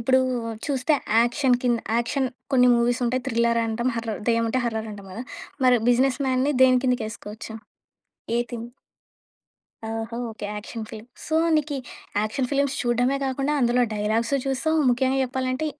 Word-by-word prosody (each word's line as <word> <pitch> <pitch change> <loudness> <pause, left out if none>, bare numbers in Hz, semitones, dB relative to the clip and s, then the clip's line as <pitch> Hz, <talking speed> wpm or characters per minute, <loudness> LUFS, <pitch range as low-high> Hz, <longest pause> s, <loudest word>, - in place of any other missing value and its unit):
ఇప్పుడు 260 +3 +3 0.5
చూస్తే 280 +1 +1 0.3
యాక్షన్ 245 +1 +3
కింద 240 -2 +2 0.2
యాక్షన్ 260 +3 0 0.3
కొన్ని 250 -1 +6
మూవీస్ 240 +1 +1
ఉంటాయి. 250 +2 0
థ్రిల్లర్ 235 0 +2
అంటాం. 235 +3 -1
హర్రర్ 225 -2 -3
దెయ్యం 230 0 +3
ఉంటె 255 +3 0
హర్రర్ 220 -1 -3
అంటాం 200 -1 -10
గదా! 230 - -5 0.4
మరి 250 -1 +6
బిజినెస్ 255 +2 +3
మ్యాన్‌ని 260 +3 +2
దేని 255 -1 +6
కిందకి 250 -2 +1
ఏసుకోవచ్చు? 215 +1 -8 0.8
ఏ - - +2
థీమ్? 235 -1 -5 1.2
ఓహో! 225 +1 -4
ఓకే. 215 -1 -8
Action 220 +2 -6
film. 220 0 -9 0.2
సో 315 - -2 0.2
నీకీ 295 -2 -1 0.4
యాక్షన్ 215 +5 -1
ఫిలి‌మ్స్ 280 0 +1
చూడ్డమే 245 +2 +1
గాకుండా, 270 +2 -1
అందులో 245 +1 +3
డైలా‌గ్సు 225 +6 0
చూస్తావు, 315 +4 +1
ముఖ్యంగా 260 +2 +1
జెప్పాలంటే 260 +3 -2
245 Hz, 150 wpm, -24 LUFS, 230-260 Hz, 1.2 s, కొన్ని